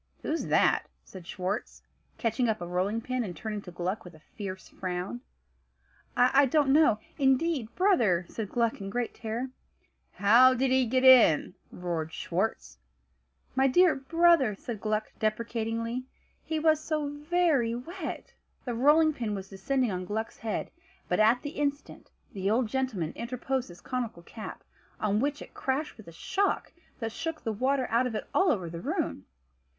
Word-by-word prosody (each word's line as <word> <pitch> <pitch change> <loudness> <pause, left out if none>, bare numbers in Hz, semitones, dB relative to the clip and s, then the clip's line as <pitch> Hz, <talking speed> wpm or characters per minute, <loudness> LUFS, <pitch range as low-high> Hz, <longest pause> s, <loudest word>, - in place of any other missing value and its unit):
"Who's 325 +2 -2
that?" - - +3 0.2
said 180 -3 -12
Schwartz, 190 +5 -4 0.3
catching 230 +1 0
up 220 -1 0
a 175 - -5
rolling 185 +6 -1
pin, 255 +1 -2
and 180 -6 -6
turning 215 +1 -4
to 180 - -10
Gluck 180 +4 -3
with 180 -2 -12
a - - -16 0.2
fierce 190 -2 -6
frown. 180 -9 -4 1.0
"I 270 +3 +5
don't 275 0 +3
know, 300 -8 +5 0.2
indeed, 265 -2 +1
brother," 235 - +3
said 215 -3 -5
Gluck 230 -2 0
in 195 - -5
great 240 +3 -2
terror. 235 +4 -4 0.6
"How 240 +6 +6
did 260 +1 +1
he 260 -1 +3
get 255 +3 +1
in?" 250 - +7 0.2
roared 170 -3 -3
Schwartz. 160 - -3 0.7
"My 265 +1 +3
dear 355 +6 +5
brother," 320 -4 +3
said 215 +1 -7
Gluck, 215 0 -1
deprecatingly, 230 +2 -2 0.4
"he 320 - -2
was 310 0 +3
so 310 -1 -2
very 295 -5 +1
wet!" 325 +7 -6 0.3
The 245 - -2
rolling 300 +6 +4
pin 225 -6 -3
was 195 -1 -7
descending 250 +5 0
on 185 0 -3
Gluck's 220 +4 -4
head; 220 -2 -3 0.4
but 180 - +1
at 225 +3 +4
the 290 - -4
instant, 285 -1 -3 0.2
the 195 0 -1
old 235 +4 +2
gentleman 225 -11 -2
interposed 250 +1 -3
his 175 0 -13
conical 235 -9 -4
cap, 215 +4 -9 0.4
on 210 -1 +1
which 285 +3 -1
it - - -16
crashed 275 +3 -2
with 220 - -14
a - - -9
shock 390 - -1 0.2
that 225 -1 -3
shook 325 +5 -5
the 225 - -1
water 260 +4 +1
out 240 +3 +3
of 230 - -5
it - - -4
all 380 -1 +4
over 185 -6 -1
the 165 0 -7
room. 300 - -3
235 Hz, 165 wpm, -29 LUFS, 200-270 Hz, 1.0 s, in